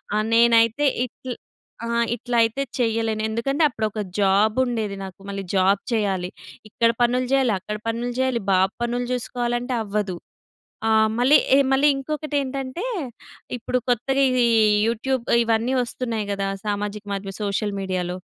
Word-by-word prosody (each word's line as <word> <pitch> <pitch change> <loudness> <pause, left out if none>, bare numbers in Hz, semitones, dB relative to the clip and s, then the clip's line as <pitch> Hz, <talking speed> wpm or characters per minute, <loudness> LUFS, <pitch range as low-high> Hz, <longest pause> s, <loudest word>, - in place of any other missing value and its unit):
ఆహ్, 215 0 +1
నేనైతే 230 +4 +4 0.2
ఇట్ల్ 250 0 -8 0.5
ఆహ్, 235 0 +1
ఇట్లయితే 235 +1 +1 0.2
చెయ్యలేను. 225 -2 0
ఎందుకంటే, 275 +8 0
అప్పుడొక 220 -3 -3 0.2
జాబుండేది 215 +2 +2
నాకు, 190 -1 -9
మళ్ళీ 195 0 -4
జాబ్ 195 +1 +3
చెయ్యాలి. 195 -5 0 0.4
ఇక్కడ 230 +2 +2
పనులు 250 +1 +2
జెయ్యాలి, 265 -4 +3
అక్కడ 210 +3 -5
పనులు 235 +2 -2
జెయ్యాలి, 260 -2 +1
బాబు 190 0 +3
పనులు 240 +1 -1
చూసుకోవాలంటే 245 0 -2
అవ్వదు. 205 -3 -2 0.7
ఆ! - - +2 0.3
మళ్ళీ 260 +5 +6 0.2
ఎ - - +7
మళ్ళీ 270 +2 +4
ఇంకొకటేంటంటే, 280 - -3 0.7
ఇప్పుడు 250 +1 -1
కొత్తగా 265 +3 +1
ఇదీ 250 -1 +2 0.4
యూట్యూబ్ 235 +2 -1 0.2
ఇవన్నీ 230 +2 +1
ఒస్తున్నాయి 230 -3 -3
గదా! 200 -1 -1 0.2
సామాజిక 205 0 -3
మాద్యం 195 0 -4
సోషల్ 205 0 -1
మీడియాలో. 180 -2 -2
230 Hz, 130 wpm, -23 LUFS, 205-250 Hz, 0.7 s, ఎ